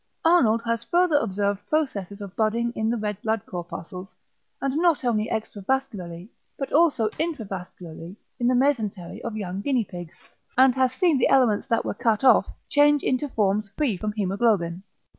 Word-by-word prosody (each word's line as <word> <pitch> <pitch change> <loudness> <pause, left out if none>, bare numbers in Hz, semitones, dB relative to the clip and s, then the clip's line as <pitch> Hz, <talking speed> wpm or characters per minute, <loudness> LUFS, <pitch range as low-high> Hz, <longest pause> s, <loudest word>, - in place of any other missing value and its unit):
Arnold 235 -10 +4
has 230 0 -1
further 350 -1 +3
observed 200 -5 -1
processes 205 - -2
of 200 -2 -8
budding 230 +2 0
in 220 0 0
the 235 - 0
red 210 -2 -4
blood 220 -1 -1
corpuscles 180 +1 -8 0.4
not 295 +2 +1
only 220 -2 +1
extravascularly 205 -5 -3 0.3
but 275 - -5
also 295 -8 +4
intravascularly 190 - -5 0.2
in 240 - +1
the 250 - +3
mesentery 220 -7 -1
of 230 -2 -5
young 190 -2 -4
guinea 250 -1 +1
pigs, 175 -3 -9 0.4
and 260 0 +6
has 260 -1 +2
seen 310 0 +2
the - - +4
elements 245 -5 +3
that 230 -3 0
were - - -2
cut 220 +2 0
off 260 - +6 0.2
change 290 0 +4
into 260 +3 0
forms 210 -2 0
free 275 -9 +1
from 210 +4 -3
hæmoglobin. 195 -4 0
220 Hz, 160 wpm, -25 LUFS, 200-265 Hz, 0.4 s, and